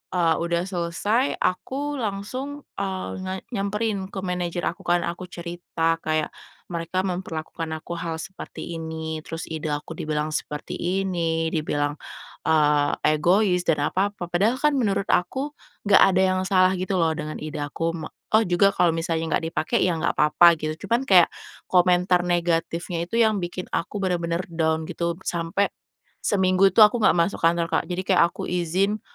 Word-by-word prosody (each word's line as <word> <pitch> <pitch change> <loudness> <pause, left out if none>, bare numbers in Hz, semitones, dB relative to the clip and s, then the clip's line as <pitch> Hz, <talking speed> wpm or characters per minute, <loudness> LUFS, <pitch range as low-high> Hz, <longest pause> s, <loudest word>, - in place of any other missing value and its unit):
eee, 170 -2 +3
udah 170 0 0
selesai 190 +7 0
aku 275 +9 -2
langsung, 255 +8 -4 0.2
eee, 190 -1 -3
nge 185 0 -4 0.2
nyamperin 200 -1 -1
ke 195 - -6
manajer 180 -1 -2
aku 170 - -2
kan, 175 0 +3
aku 170 +2 -4
cerita 170 -1 -2
kayak, 155 -1 -1 0.4
"Mereka 170 +1 -2
memperlakukan 170 -3 -4
aku 170 - -6
hal 165 -1 -3
seperti 175 -1 -7
ini, 160 -1 -5
terus 165 +1 -5
ide 155 -1 -4
aku 145 +2 -5
dibilang 155 0 -2
seperti 150 +3 -4 0.3
ini, 165 -3 0
dibilang, 145 -2 -1 0.5
eee, 150 -2 +3 0.2
egois 180 +2 +2
dan 150 -3 +2
apa-apa." 195 -2 -2
Padahal 205 +8 +2
kan 300 -1 +3
menurut 200 -5 0
aku, 265 +12 0 0.4
gak - - +7
ada 185 - +4 0.2
yang - - 0
salah 185 -1 +4
gitu 185 +1 -2
loh 160 -1 +2
dengan 150 0 -5
ide 155 0 -5
aku 155 +3 -2
me 160 -2 -6 0.3
oh 220 - +6
juga 190 +1 +4
kalau 175 -4 +3
misalnya 165 -1 -1
gak - - -6
dipakai 165 +8 0
ya 180 -2 +1
gak 160 - 0
apa-apa 170 +2 +6
gitu, 155 +4 -4
cuman 240 +6 +1
kayak 180 -3 +7 0.4
komentar 180 0 +4
negatifnya 170 0 -1
itu 230 - -5
yang 220 -3 +3
bikin 180 0 -4
aku 170 - -3
bener-bener 170 -1 -1
down 160 -1 0
gitu 170 0 -2
sampai 170 +4 0 0.5
seminggu 190 -1 +3
itu 220 - +5
aku 210 +3 +4
gak - - +6
masuk 170 +3 +1
kantor, 165 0 +2
Kak. - - +2
Jadi 180 0 -2
kayak 180 - +6
aku - - -6
izin 180 +4 0
175 Hz, 165 wpm, -24 LUFS, 165-195 Hz, 0.5 s, gak